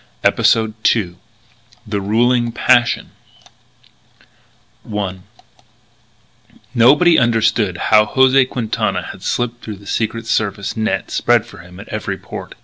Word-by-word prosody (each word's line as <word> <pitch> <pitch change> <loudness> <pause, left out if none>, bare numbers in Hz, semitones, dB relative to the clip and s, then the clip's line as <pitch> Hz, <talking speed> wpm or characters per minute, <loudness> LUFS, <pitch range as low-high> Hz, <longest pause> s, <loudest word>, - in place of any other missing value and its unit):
EPISODE 110 -1 +2
TWO 90 -6 +1 0.7
THE 105 -2 -3
RULING 120 +4 +1
PASSION 120 -1 +2 1.8
I 100 -3 -3 1.5
Nobody 145 +9 +5
understood 115 -5 +1
how 105 -1 +3
José 130 +1 +3
Quintana 115 -4 -2
had - - -14
slipped 120 0 -3
through 110 - -6
the 100 +1 -17
Secret 115 +2 -3
Service 100 -3 -2
net 110 0 -2
spread - - +2
for - - -14
him 90 +2 -14
at - - -11
every - - -4
port. - - -9
115 Hz, 115 wpm, -17 LUFS, 105-120 Hz, 1.8 s, Nobody